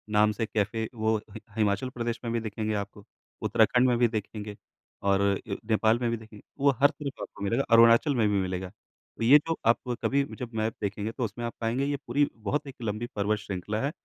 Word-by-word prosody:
नाम 105 Hz, 0 st, +5 dB
से 110 Hz, +2 st, -2 dB
कैफे 110 Hz, +1 st, -1 dB
वो 110 Hz, 0 st, +1 dB
हि 110 Hz, -, -8 dB, 0.2 s
हिमाचल 110 Hz, +4 st, +1 dB
प्रदेश 115 Hz, -1 st, -2 dB
में 115 Hz, -, -2 dB
भी 115 Hz, -, +1 dB
दिखेंगे 110 Hz, 0 st, -3 dB
आपको, 100 Hz, 0 st, -5 dB, 0.4 s
उत्तराखंड 125 Hz, +1 st, +3 dB
में 120 Hz, -, +3 dB
भी 120 Hz, 0 st, +4 dB
देखेंगे 105 Hz, 0 st, -6 dB, 0.5 s
और 100 Hz, 0 st, +3 dB
अ, 100 Hz, 0 st, 0 dB, 0.2 s
नेपाल 110 Hz, +2 st, +3 dB
में 120 Hz, -1 st, 0 dB
भी 115 Hz, -, -1 dB
देखें। 110 Hz, -1 st, -13 dB, 0.2 s
वो 140 Hz, 0 st, +5 dB
हर 145 Hz, -, +7 dB
तरफ 140 Hz, -2 st, -7 dB
आपको -, -, -7 dB
मिलेगा, 115 Hz, +7 st, +1 dB
अरुणाचल 115 Hz, +5 st, +6 dB
में 110 Hz, -3 st, +3 dB
भी 100 Hz, -1 st, +2 dB
मिलेगा, 95 Hz, 0 st, -3 dB
तो 115 Hz, -, -13 dB
ये 135 Hz, +6 st, +8 dB
जो 165 Hz, -, 0 dB
आप 120 Hz, +1 st, +2 dB
कभी 140 Hz, +1 st, +2 dB, 0.2 s
जब 120 Hz, -2 st, -6 dB
मैप 110 Hz, +1 st, 0 dB
देखेंगे 105 Hz, +2 st, -2 dB
तो 125 Hz, -, -4 dB
उसमें 115 Hz, +3 st, -5 dB
आप 115 Hz, -, -4 dB
पाएँगे 120 Hz, +4 st, 0 dB
ये 145 Hz, 0 st, -1 dB
पूरी 140 Hz, +4 st, +2 dB
बहुत 140 Hz, +8 st, -2 dB
एक 135 Hz, -, -8 dB
लंबी 110 Hz, +2 st, -3 dB
पर्वत 105 Hz, +1 st, 0 dB
श्रृंखला 105 Hz, +1 st, -4 dB
है। 140 Hz, -, -1 dB
110 Hz, 215 wpm, -28 LUFS, 105-120 Hz, 0.5 s, ये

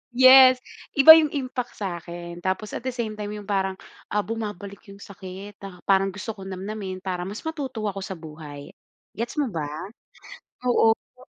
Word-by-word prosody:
Yes, 255 Hz, 0 st, +8 dB, 0.3 s
iba 280 Hz, +3 st, +10 dB
'yung 310 Hz, -, +2 dB
impact 255 Hz, -3 st, -4 dB
sa 185 Hz, -4 st, -4 dB
akin. 170 Hz, 0 st, -8 dB
Tapos, 190 Hz, +4 st, -2 dB
at -, -, -4 dB
the 260 Hz, -1 st, -3 dB
same 220 Hz, -3 st, -3 dB
time 210 Hz, -, -3 dB
'yung 210 Hz, -, -7 dB
parang, 195 Hz, -2 st, 0 dB, 0.3 s
ah, 210 Hz, 0 st, 0 dB
bumabalik 205 Hz, -3 st, -6 dB
'yung 200 Hz, 0 st, -12 dB
sakit. 195 Hz, +1 st, -10 dB
Ta 190 Hz, -3 st, -11 dB
parang 195 Hz, 0 st, +3 dB
gusto 205 Hz, +3 st, -5 dB
ko 205 Hz, -, -12 dB
nam-namin 190 Hz, 0 st, -6 dB
para 180 Hz, -1 st, -3 dB
mas 205 Hz, +3 st, -7 dB
matuto 275 Hz, -8 st, -4 dB
ako 195 Hz, -, -7 dB
sa 195 Hz, 0 st, -5 dB
buhay. 150 Hz, -3 st, -10 dB, 0.5 s
Gets 235 Hz, +2 st, -3 dB
mo 265 Hz, -5 st, -2 dB
ba? 160 Hz, -4 st, -3 dB, 1.0 s
Oo, 225 Hz, -2 st, +5 dB, 0.2 s
no? 255 Hz, -, -16 dB
200 Hz, 175 wpm, -24 LUFS, 185-235 Hz, 1.0 s, iba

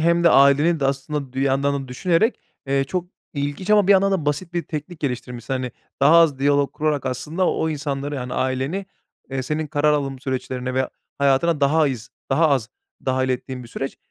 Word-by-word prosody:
hem 170 Hz, +1 st, +3 dB
de 170 Hz, -, +7 dB
aileni 140 Hz, +4 st, +5 dB
de 135 Hz, -, +2 dB
aslında 140 Hz, 0 st, -3 dB
dir 130 Hz, -, -3 dB
yandan 140 Hz, +1 st, +1 dB
da -, -, -14 dB
düşünerek, 180 Hz, -, +1 dB, 0.3 s
eee, 135 Hz, 0 st, +1 dB
çok 180 Hz, +5 st, -2 dB, 0.3 s
ilginç 145 Hz, +7 st, -3 dB
ama 210 Hz, -2 st, +5 dB
bir 200 Hz, -, +7 dB
yandan 195 Hz, 0 st, +4 dB
da 165 Hz, -6 st, -1 dB
basit 160 Hz, +4 st, -1 dB
bir 175 Hz, -, 0 dB
teknik 155 Hz, +2 st, -7 dB
geliştirmişsin. 125 Hz, -2 st, -3 dB
Hani, 125 Hz, -2 st, -3 dB, 0.3 s
daha 150 Hz, +4 st, +6 dB
az 165 Hz, -5 st, +5 dB
diyalog 140 Hz, 0 st, +2 dB
kurarak 150 Hz, -3 st, -1 dB
aslında 155 Hz, +8 st, -1 dB
o 160 Hz, -, 0 dB
insanları, 145 Hz, -1 st, -3 dB
yani, 125 Hz, -2 st, -4 dB
aileni, 135 Hz, +9 st, -1 dB, 0.4 s
eee, 135 Hz, 0 st, -2 dB
senin 155 Hz, +4 st, -2 dB
karar 150 Hz, 0 st, +2 dB
alım 140 Hz, -2 st, -1 dB
süreçlerine 130 Hz, -1 st, -3 dB
ve 130 Hz, 0 st, +1 dB, 0.3 s
hayatına 140 Hz, +3 st, +2 dB
daha 150 Hz, +2 st, +4 dB
iz 125 Hz, -2 st, -6 dB, 0.2 s
daha 160 Hz, +4 st, +4 dB
az 130 Hz, -6 st, +1 dB, 0.4 s
dâhil 130 Hz, 0 st, +1 dB
ettiğin 130 Hz, 0 st, -3 dB
bir 120 Hz, -, -12 dB
süreç. 135 Hz, +3 st, -5 dB
140 Hz, 190 wpm, -22 LUFS, 130-160 Hz, 0.4 s, de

